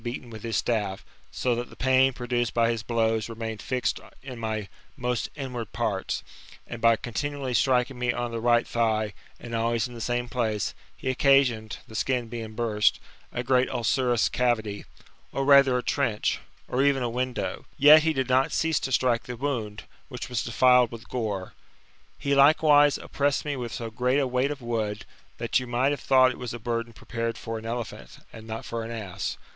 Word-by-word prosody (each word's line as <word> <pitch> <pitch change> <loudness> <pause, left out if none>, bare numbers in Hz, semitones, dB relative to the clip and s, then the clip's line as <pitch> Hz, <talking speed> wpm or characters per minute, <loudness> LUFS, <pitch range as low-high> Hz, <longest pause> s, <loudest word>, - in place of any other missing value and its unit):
XI5 - - -22
beaten 120 0 -5
with 110 -1 -9
his 115 -3 -2
staff, 105 -5 -1 0.2
so 125 - 0
that 120 +1 -3
the - - -14
pain 130 0 +4
produced 120 -2 -2
by 115 0 +3
his 115 -2 -2
blows 115 -1 0
remained 110 -1 -5
fixed 130 -1 -1 0.2
in 130 -3 -8
my 110 -2 -3 0.3
most 125 -2 -1
inward 125 -6 -5
(>arts: - - -2 0.4
and 115 - -8
by 115 0 +6
continually 135 +3 -3
striking 125 0 +2
me 125 -1 +1
on 120 0 -3
the 115 - -3
right 120 0 +3
thigh, 110 -2 0 0.3
and 120 -1 -8
always 115 0 0
in 125 - -12
the 115 - -8
same 120 +1 -1
place, 110 -4 -1 0.2
he - - -7
occasioned, 125 -5 +3
the - - -13
skin 120 +2 -1
being 110 -2 -6
burst, 110 -3 +2 0.3
a 120 - -3
great 130 0 +2
ulcerous 120 0 +1
cavity, 110 -5 -1 0.5
or 135 - -1
rather 140 -2 +6
a 125 - -2
trench, 120 -7 0 0.3
or 125 - 0
even 140 -2 +3
a - - 0
window; 125 +2 -3
yet 150 +2 +9
he 160 +1 +2
did 130 -4 -1
not 130 +1 +3
cease 160 -2 +1
to 135 - -4
strike 120 -2 +2
the 125 -1 -6
wound, 115 -6 -3 0.3
which 125 -3 -6
was 125 -2 -1
defiled 125 +1 +4
with 115 -1 -9
gore. 105 -6 -3 0.6
He 140 - -1
likewise 145 0 +6
op - - -12
pressed 140 0 +1
me 145 -1 -1
with 120 -3 -5
so 115 0 -5
great 125 +4 +1
a 140 - +2
weight 130 +2 +1
of 145 -3 -6
wood, 110 -3 -2 0.3
that 120 +2 +1
you 125 - -6
might 125 +3 +1
have 145 - -3
thought 130 -1 +5
it - - -9
was 120 -1 -5
a - - -4
burden 115 0 -3
prepared 115 0 -4
for 115 -1 -5
an 110 - -8
elephant, 120 0 -6 0.2
and 110 0 -11
not 110 0 -5
for 115 -1 -4
an 115 - -6
ass. 100 -6 -4
120 Hz, 195 wpm, -26 LUFS, 115-130 Hz, 0.6 s, yet